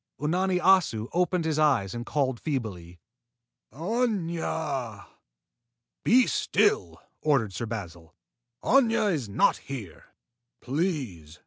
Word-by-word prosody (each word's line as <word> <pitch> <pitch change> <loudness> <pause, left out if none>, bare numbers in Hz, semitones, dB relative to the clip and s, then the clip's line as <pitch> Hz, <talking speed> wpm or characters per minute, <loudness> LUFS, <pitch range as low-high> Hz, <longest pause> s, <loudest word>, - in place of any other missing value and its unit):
Unani 180 +4 +1
Assu 175 - +3
opened 180 -1 +1
his 155 -1 0
eyes 135 -11 +2
and 120 0 -6
called 130 -5 0
feebly, 95 - -4 0.7
"Aña!" 160 - -2 1.0
"Be 250 +2 +5
still!" 420 +2 +1 0.2
ordered 135 -10 +1
Sir 115 - -4
Basil. 85 -7 -7 0.5
"Aña 230 -5 +3
is 130 -10 -3
not 100 - +3
here." 115 - -8 0.5
"Please!" 125 - -3
145 Hz, 100 wpm, -27 LUFS, 110-180 Hz, 1.0 s, Be